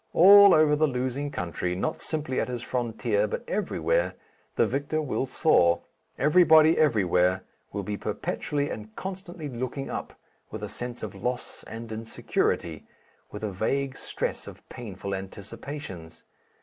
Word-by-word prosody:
All 200 +2 +9
over 155 -1 +5
the 155 +1 +3
losing 130 +2 -2
country, 90 - -3
not 155 - -2
simply 150 -5 -2
at - - 0
his 125 -1 -4
frontier 115 -4 0
but - - -4
everywhere, 485 - 0 0.4
the - - +4
victor 145 +3 -1
will 135 -3 -1
soar. 85 - +3 0.4
Everybody 160 0 +6
everywhere 95 - +3 0.3
will 100 0 -3
be 105 +2 -3
perpetually 145 +6 -2
and 110 0 -8
constantly 185 -4 -6
looking 130 +1 -4
up, - - -5 0.4
with - - -7
a - - -4
sense 120 0 -6
of - - -5
loss 125 0 -4
and 115 +1 -7
insecurity, 110 -7 -2 0.4
with 105 - -8
a 105 - -1
vague 135 +8 -1
stress - - -4
of - - -12
painful 100 -4 -6
anticipations. 95 - -7
125 Hz, 140 wpm, -27 LUFS, 105-150 Hz, 0.4 s, All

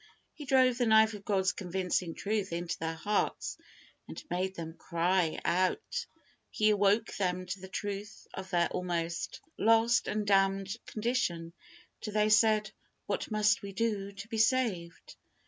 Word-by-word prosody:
He 295 - -9
drove 255 -2 +4
the 245 - +2
knife 220 0 +5
of 205 -1 -9
God's 190 -2 +2
convincing 180 -2 -2
truth 205 -2 -2
into 170 0 -2
their 165 0 -2
hearts, 205 +6 -1 0.5
and - - -7
made 185 +1 -1
them 165 -1 -6
cry 170 0 0
out. 295 - 0 0.4
He 215 0 +2
awoke 205 +2 +2
them 185 -2 -1
to 180 +2 -5
the 190 - -9
truth 205 +2 -6
of 190 0 -7
their 175 -2 +2
almost 170 -2 -3 0.2
lost 225 +2 +4
and 210 0 -1
damned 195 0 +2
condition, 210 -8 -1 0.5
till 215 - -5
they 210 0 +3
said, 215 -1 +4 0.3
"What - - -3
must 215 -1 +2
we 200 -1 -7
do 205 -2 -1
to 200 +2 -9
be 225 0 -3
saved?" 215 - 0
200 Hz, 150 wpm, -31 LUFS, 180-220 Hz, 0.5 s, knife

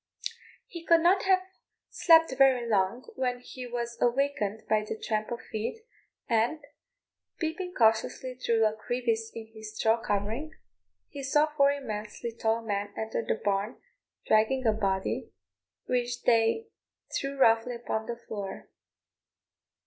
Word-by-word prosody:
He 340 -2 -9
could 335 0 +5
not 370 +3 +4
have 375 -1 +4 0.5
slept 325 -4 +5
very 260 -3 +4
long 210 +3 +1
when 250 -1 -1
he 250 0 -8
was 235 -1 -4
awakened 240 -4 +1
by 215 -1 +2
the 215 - -5
tramp 215 -1 -2
of 240 - -4
feet, 230 - -4 0.4
and, 240 +6 +1 0.7
peeping 355 +3 -3
cautiously 225 +3 +2
through 230 -3 +1
a 215 - +2
crevice 225 0 -1
in 225 -1 -8
his 220 -1 -9
straw 225 +1 +2
covering, 225 +11 -2 0.5
he 285 - -8
saw 295 +3 +2
four 280 -1 +5
immensely 225 -4 -5
tall 230 0 0
men 205 -2 -2
enter 220 +1 -2
the - - 0
barn, 200 +4 0 0.5
dragging 230 +4 +3
a 220 - +4
body, 195 -3 -1 0.6
which 245 -1 -1
they 230 - +3 0.5
threw 275 0 -2
roughly 230 -1 +4
upon 220 -2 -3
the 235 - -4
floor. 200 -2 -6
235 Hz, 135 wpm, -29 LUFS, 220-270 Hz, 0.7 s, could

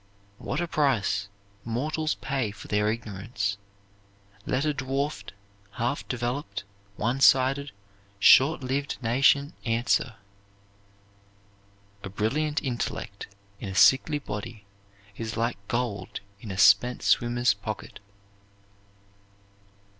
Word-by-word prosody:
What 135 - -3
a 175 - -1
price 105 - +1 0.4
mortals 155 +7 -1
pay 135 -5 -2
for 100 - -11
their 105 0 +1
ignorance, 105 -2 -4 0.9
let 130 +4 0
a 150 - +1
dwarfed, 135 -4 -3 0.4
half 120 +5 -2
developed, 120 -4 -3 0.3
one 120 +6 -1
sided, 135 +2 +4 0.5
short 135 +8 +6
lived 140 +2 -2
nation 140 +5 +3
answer. 115 0 0 1.9
"A 95 - -5
brilliant 145 +10 -1
intellect 120 -6 -4 0.3
in 100 - -5
a 95 - -6
sickly 135 +9 +5
body 105 -4 -7 0.5
is 115 0 -5
like 115 -1 -1
gold 120 -4 -3 0.2
in 110 - -9
a 95 - -5
spent 125 +6 +5
swimmer's 120 +1 +3
pocket." 105 +1 -7
120 Hz, 100 wpm, -27 LUFS, 105-140 Hz, 1.9 s, short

